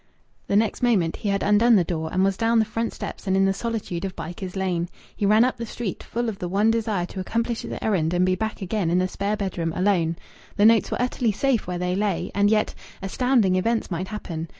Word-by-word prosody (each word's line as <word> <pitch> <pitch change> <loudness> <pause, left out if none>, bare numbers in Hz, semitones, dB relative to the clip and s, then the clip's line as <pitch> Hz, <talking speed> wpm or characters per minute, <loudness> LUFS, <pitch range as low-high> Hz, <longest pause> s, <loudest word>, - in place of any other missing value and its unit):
The 200 - 0
next 215 +1 +1
moment 200 -10 +2
he 205 - -3
had 195 0 0
undone 220 +3 +5
the 185 - +4
door 160 -2 -3
and 185 +1 +2
was 195 0 +2
down 230 +2 +2
the 220 - +4
front 225 +2 -2
steps - - -7
and 190 0 +2
in 195 - +4
the 195 - +2
solitude 210 -5 -4
of 190 -1 -4
Bycars 180 +3 -6
Lane. 180 -3 -1 0.3
He 200 - 0
ran 215 +3 +6
up 255 - -1
the 235 - -4
street, 215 -4 -5
full 240 +1 -3
of 215 -4 -4
the 175 - -3
one 205 +4 +3
desire 215 -5 0
to 190 - -8
accomplish 230 +5 -1
his - - -5
errand 170 -7 +1
and 180 +1 +3
be 185 - +2
back 220 +1 -3
again 190 -2 -1
in 175 - +2
the 185 0 +2
spare 200 +3 -2
bedroom 175 -5 -2
alone. 180 -4 +1 0.4
The 205 - +3
notes 225 0 +5
were - - -2
utterly 245 -2 +1
safe 245 +1 0
where 180 -1 -2
they 180 +1 -1
lay, 200 -2 -1
and 200 0 +3
yet 215 0 +2 0.3
astounding 215 -2 +2
events 225 +2 0
might 180 +2 -2
happen. 170 -6 -5
200 Hz, 240 wpm, -24 LUFS, 180-225 Hz, 0.4 s, ran